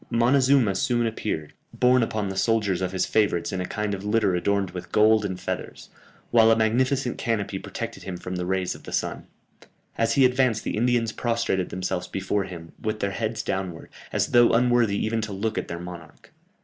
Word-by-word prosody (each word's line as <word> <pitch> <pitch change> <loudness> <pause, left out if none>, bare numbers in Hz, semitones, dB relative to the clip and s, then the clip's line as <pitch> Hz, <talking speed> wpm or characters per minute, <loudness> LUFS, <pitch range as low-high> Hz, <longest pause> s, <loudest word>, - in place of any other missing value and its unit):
Montezuma 125 -1 +3
soon 120 +1 +1
appeared, 105 -9 -3 0.2
borne 125 0 +4
upon 110 -3 -1
the 95 - -5
shoulders 100 -3 +1
of 90 -1 -1
his 95 - 0
favourites 100 -5 +1
in 95 -2 -2
a 90 - -3
kind 105 -1 -2
of 95 0 -5
litter 105 -2 +2
adorned 100 +1 0
with 90 - -8
gold 110 0 +4
and 95 -2 -3
feathers, - - -5 0.4
while 115 -1 +6
a 115 - +6
magnificent 125 +3 +1
canopy 100 -5 -1
protected - - -6
him 95 -2 -6
from 90 +1 -6
the 90 0 -3
rays 95 -1 0
of - - -12
the - - -9
sun. - - -2 0.7
As 115 - +2
he 135 -2 +5
advanced 125 -3 +2
the - - -2
Indians 115 0 +1
prostrated 115 -6 -1
themselves 90 -1 -3
before 95 +1 -1
him, 85 -3 -9
with 110 0 -2
their 100 -1 -1
heads 110 +1 -3
downwards, 95 -5 -4 0.2
as - - 0
though 120 -1 +5
unworthy 120 -3 +3
even 110 +1 -1
to 110 -1 -4
look 105 +3 -2
at - - -6
their 85 - -5
monarch. 85 -2 -11
105 Hz, 195 wpm, -25 LUFS, 95-115 Hz, 0.7 s, while